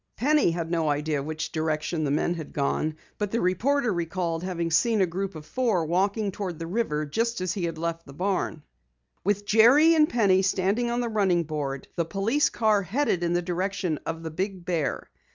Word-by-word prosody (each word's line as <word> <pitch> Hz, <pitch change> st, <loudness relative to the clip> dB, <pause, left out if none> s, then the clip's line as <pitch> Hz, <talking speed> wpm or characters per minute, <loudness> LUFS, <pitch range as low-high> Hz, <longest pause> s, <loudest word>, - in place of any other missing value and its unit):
Penny 295 Hz, -, +3 dB
had 165 Hz, 0 st, -3 dB
no 165 Hz, -3 st, +1 dB
idea 150 Hz, 0 st, 0 dB
which 155 Hz, +2 st, -4 dB
direction 155 Hz, +1 st, -1 dB
the 145 Hz, -, 0 dB
men 150 Hz, +4 st, +1 dB
had 160 Hz, -4 st, -7 dB
gone, 150 Hz, +2 st, -1 dB, 0.2 s
but 210 Hz, -1 st, -1 dB
the 230 Hz, -, -1 dB
reporter 235 Hz, +7 st, +1 dB
recalled 170 Hz, -1 st, -2 dB
having 170 Hz, -2 st, -2 dB
seen 225 Hz, +6 st, +3 dB
a 190 Hz, -, +5 dB
group 185 Hz, +2 st, -4 dB
of 155 Hz, -1 st, -9 dB
four 220 Hz, -4 st, 0 dB
walking 195 Hz, +5 st, 0 dB
toward 185 Hz, -4 st, -5 dB
the 165 Hz, -, -5 dB
river 165 Hz, -5 st, -1 dB
just 230 Hz, +10 st, -1 dB
as 185 Hz, -1 st, -1 dB
he 190 Hz, -4 st, -2 dB
had 165 Hz, -1 st, -4 dB
left 165 Hz, 0 st, -4 dB
the -, -, -10 dB
barn. 180 Hz, -2 st, -2 dB, 0.6 s
With 205 Hz, +1 st, 0 dB
Jerry 240 Hz, +10 st, +6 dB
and 310 Hz, -2 st, +4 dB
Penny 200 Hz, -5 st, +3 dB
standing 195 Hz, +5 st, +1 dB
on 240 Hz, +1 st, 0 dB
the 240 Hz, -, -1 dB
running 190 Hz, -6 st, +2 dB
board, 145 Hz, -4 st, -4 dB
the 170 Hz, -, +1 dB
police 220 Hz, -, +1 dB
car 215 Hz, -3 st, +2 dB
headed 200 Hz, -1 st, 0 dB
in 170 Hz, 0 st, +1 dB
the 175 Hz, 0 st, +1 dB
direction 180 Hz, -2 st, -2 dB
of 165 Hz, 0 st, -4 dB
the 160 Hz, -, -5 dB
Big 185 Hz, +1 st, -4 dB
Bear. 165 Hz, -5 st, -1 dB
180 Hz, 200 wpm, -26 LUFS, 165-210 Hz, 0.6 s, Jerry